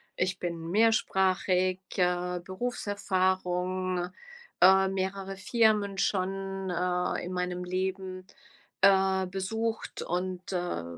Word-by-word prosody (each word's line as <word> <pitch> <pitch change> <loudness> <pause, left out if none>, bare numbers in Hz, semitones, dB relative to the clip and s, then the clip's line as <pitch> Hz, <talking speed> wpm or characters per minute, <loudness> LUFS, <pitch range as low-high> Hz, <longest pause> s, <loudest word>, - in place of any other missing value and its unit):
ich 185 0 -1
bin 170 -1 -4
mehrsprachig, 190 -4 +2 0.2
äh, 180 -1 +1
Berufserfahrung, 185 -3 -1 0.5
äh, 190 +1 +7
mehrere 195 0 -3
Firmen 210 -1 +2
schon, 195 0 -1
äh, 180 0 0
in 180 - -5
meinem 180 0 -2
Leben, 185 0 -3 0.6
äh, 190 -1 +4
besucht 220 +4 -3
und, 180 +1 -3
äh, 175 - -2
185 Hz, 95 wpm, -29 LUFS, 180-195 Hz, 0.6 s, äh